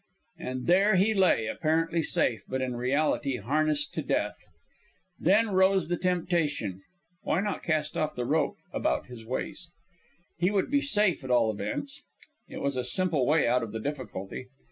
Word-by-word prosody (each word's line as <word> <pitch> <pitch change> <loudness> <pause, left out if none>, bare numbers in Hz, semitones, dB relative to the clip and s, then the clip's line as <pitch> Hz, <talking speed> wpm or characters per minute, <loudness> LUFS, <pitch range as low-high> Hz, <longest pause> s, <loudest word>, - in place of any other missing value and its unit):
And 130 0 -4
there 195 +4 +4
he 200 +4 +3
lay, 185 - +3
apparently 165 +6 0
safe, 120 -6 +1
but 130 - -2
in 130 -1 -2
reality 135 +1 0
harnessed 145 +6 0
to - - -2
death. - - 0 0.9
Then 210 +5 +3
rose 190 -2 +3
the 175 - +1
temptation. 165 - -1 0.4
Why - - 0
not 205 -1 -2
cast 155 -2 -1
off 155 0 -1
the 125 - -2
rope 150 +2 0 0.2
about - - 0
his 115 -3 -11
waist? 165 +7 -4 0.7
He 175 +2 +3
would 200 +2 0
be 285 0 +3
safe 210 - +2
at 130 - -7
all 120 -3 +3
events. 105 - -4 0.5
It - - -7
was 140 -1 0
a 125 - 0
simple 145 +1 +2
way 150 -3 +3
out 125 +1 +3
of 115 -2 -6
the 110 - -3
difficulty. 125 -4 -5
155 Hz, 165 wpm, -28 LUFS, 125-180 Hz, 0.9 s, there